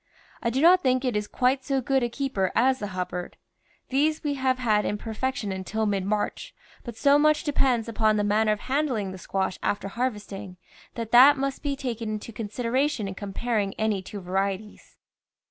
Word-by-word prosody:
I 235 - 0
do 260 +4 0
not 355 +3 +6
think 255 -2 +1
it 250 -4 0
is 210 0 -1
quite 260 +1 +1
so 270 0 0
good 265 +1 +1
a 240 - 0
keeper 235 -7 -1
as 260 +3 +3
the 205 - -3
Hubbard; 180 -2 -5 0.5
these 300 +4 +1
we 295 -1 0
have 260 -2 0
had 215 -4 +2
in 210 - -1
perfection 225 -1 -3
until 190 +4 -2
mid 200 -3 0
March, 210 +1 -2 0.3
but 235 -3 -8
so 285 +1 +5
much 305 0 +3
de 295 -2 -2
pends 245 -5 +2
upon 220 -1 +2
the 205 - +1
manner 215 +1 +2
of 210 - -1
handling 260 -8 -1
the 185 - -9
squash 190 0 -2
after 205 -1 -1
harvesting 210 -5 -4 0.4
that 230 -1 -5
that 270 +4 +8
must 275 0 -2
be 285 -1 -1
taken 235 -5 -4
into 215 +1 -5
con 210 0 -5
sideration 245 +1 -1
in 195 - -5
comparing 205 +1 -2
any 215 -3 0
two 200 +2 -8
varieties. 195 +3 -3
230 Hz, 195 wpm, -26 LUFS, 205-265 Hz, 0.5 s, that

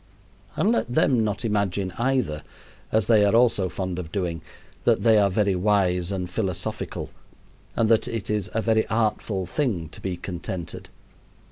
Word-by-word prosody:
And 215 - +2
let 175 - 0
them 120 -1 +3
not 110 +2 -2
imagine, 100 -3 0
either 120 - 0 0.5
as 110 -2 +2
they 110 -3 +5
are 100 +2 +3
also 115 -6 +3
fond 95 +1 -4
of 80 -3 -7
doing 85 -4 -2 0.4
that - - +2
they 110 -2 +6
are 100 -1 +4
very 100 +1 +1
wise 90 -2 +1
and 90 -2 -2
philosophical 95 -1 -3 0.6
and 115 - +2
that 115 -1 +3
it 115 -4 -4
is 105 -2 -1
a 110 - +1
very 110 -1 +2
artful 110 -3 0
thing 95 - -1
to - - -11
be 95 -2 -3
contented. 90 -1 -6
100 Hz, 160 wpm, -25 LUFS, 90-110 Hz, 0.6 s, they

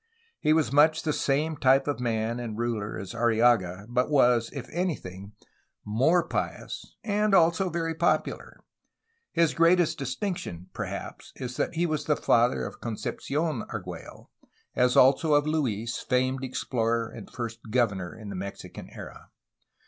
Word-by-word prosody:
He 155 - +2
was 155 -1 +3
much 155 +3 +4
the 155 -2 0
same 150 +4 0
type 135 +1 +4
of 145 -3 -1
man 115 -1 -1
and 115 -3 -5
ruler 115 -3 -2
as 95 -2 -7
Arrillaga, 110 -5 +2
but 125 +3 0
was, 125 -5 +4
if 135 -4 -7
anything, 105 - -4 0.5
more 145 +12 +2
pious - - -4
and 210 -2 +2
also 170 +2 +4
very 165 -1 -2
popular. 170 +2 -1 0.7
His 165 -2 +2
greatest 170 -1 +3
distinction, 130 - -4
perhaps, - - -6
is 125 -1 -6
that 150 - -1
he 170 +2 +1
was 155 -3 -2
the 150 - +2
father 120 +2 +2
of - - -8
Concepci6n 135 +4 -3
Argiiello, 90 -4 -8 0.5
as 125 0 +3
also 140 +4 +5
of 145 0 +3
Luis, 120 -8 -1
famed 130 +1 0
explorer 115 -3 -1
and 115 -2 -10
first 115 -2 -5
governor 105 -5 0
in 110 -2 -9
the 100 - -5
Mexican 100 +2 -7
era. - - -11
125 Hz, 145 wpm, -27 LUFS, 115-155 Hz, 0.7 s, also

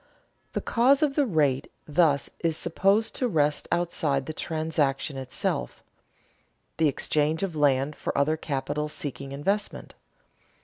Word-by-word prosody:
The - - -1
cause 265 +5 +3
of 290 -2 +2
the 285 -2 +2
rate 145 - +1 0.2
thus 150 -2 +2
is 165 -2 0
supposed 195 +6 +1
to 255 - +1
rest 150 -7 +1
outside 160 -6 0
the 155 - -5
transaction 155 -4 -1
itself, 130 - -3 0.9
the 160 - +4
exchange 150 +3 0
of 185 -5 -2
land 145 0 +2
for - - -3
other 145 +3 +3
capital 150 0 -3
seeking 140 -2 -6
investment. 195 +9 -2
155 Hz, 130 wpm, -27 LUFS, 140-175 Hz, 0.9 s, the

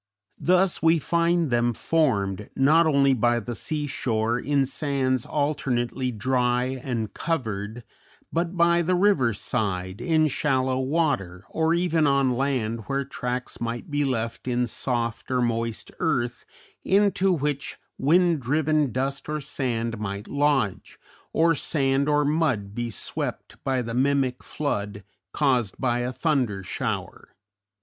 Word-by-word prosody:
Thus 185 +1 +2
we 165 +1 +5
find 170 -1 +1
them 120 0 +2
formed 105 - 0
not 155 +5 +5
only 140 -2 +4
by 120 0 +2
the 120 +1 -5
sea 150 +5 -3
shore, 115 -4 -1
in 140 +1 +1
sands 135 -3 0
alternately 130 -4 -1
dry 125 +1 +1 0.2
and 115 -5 -3
covered, 110 -7 -3 0.5
but 170 +2 -1
by 170 0 +4
the 180 +2 +1
river 175 - +3
side, 100 -2 -2
in 155 +4 +3
shallow 130 -3 +1
water, 130 - -1
or 160 +1 +1
even 165 -3 +2
on 140 -2 +3
land 125 -4 -1
where 140 0 -1
tracks 125 -2 -4
might 120 +4 -4
be 145 0 +1
left 115 -3 -2
in 125 0 +1
soft 115 -1 -2
or 130 -1 +1
moist 115 -1 -2
earth 120 -8 -1 0.4
into 195 -1 +3
which 145 -4 -2 0.2
wind 170 +3 +3
driven 150 +1 +1
dust 135 +4 -2
or 150 0 -1
sand 120 -6 -2
might 100 0 -4
lodge, 140 -8 0 0.3
or 165 +1 +3
sand 140 -2 +1
or 150 0 +3
mud 140 -10 0
be 120 +1 -3
swept 105 - -5
by 130 -2 0
the 115 0 -5
mimic 130 0 +1
flood 105 -8 -3 0.3
caused 125 -9 +1
by 120 -2 +1
a 120 +1 -2
thunder 125 - 0
shower. - - -4
130 Hz, 135 wpm, -25 LUFS, 120-150 Hz, 0.5 s, we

